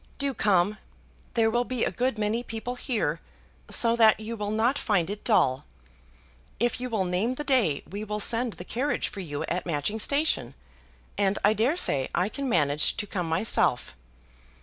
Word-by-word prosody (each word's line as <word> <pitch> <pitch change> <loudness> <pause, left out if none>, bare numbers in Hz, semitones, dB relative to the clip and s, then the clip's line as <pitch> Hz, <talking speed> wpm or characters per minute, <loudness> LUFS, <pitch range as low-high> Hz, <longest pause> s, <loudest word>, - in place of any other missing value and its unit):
Do 280 -1 -1
come! 205 -2 +2 0.6
There 225 -1 +3
will 240 +1 +1
be 250 -1 -1
a - - -1
good 250 -1 -1
many 215 +2 0
people 230 +1 -5
here, 220 - -2 0.5
so 230 -1 +4
that 220 -2 +5
you 220 +2 -5
will 210 -2 -4
not 230 +6 +1
find 195 -4 0
it 205 - -7
dull. 140 - +2 1.0
If 240 +1 0
you 250 - -3
will 215 -5 0
name 190 +8 0
the 295 - -4
day 240 - +1
we 200 +4 -6
will 210 0 -4
send 230 +2 +1
the 175 - -10
carriage 260 +9 -1
for 200 - -9
you 145 -6 -4
at 180 +1 -3
Matching 170 +7 -1
Station, 280 - 0 0.6
and 200 0 +2
I 210 - +5
dare 240 +10 +1
say 135 - +3
I 180 +4 +1
can 275 +3 -4
manage 150 -6 +1
to 210 - -2
come 180 -4 -3
myself. 160 - +1
215 Hz, 180 wpm, -27 LUFS, 180-240 Hz, 1.0 s, that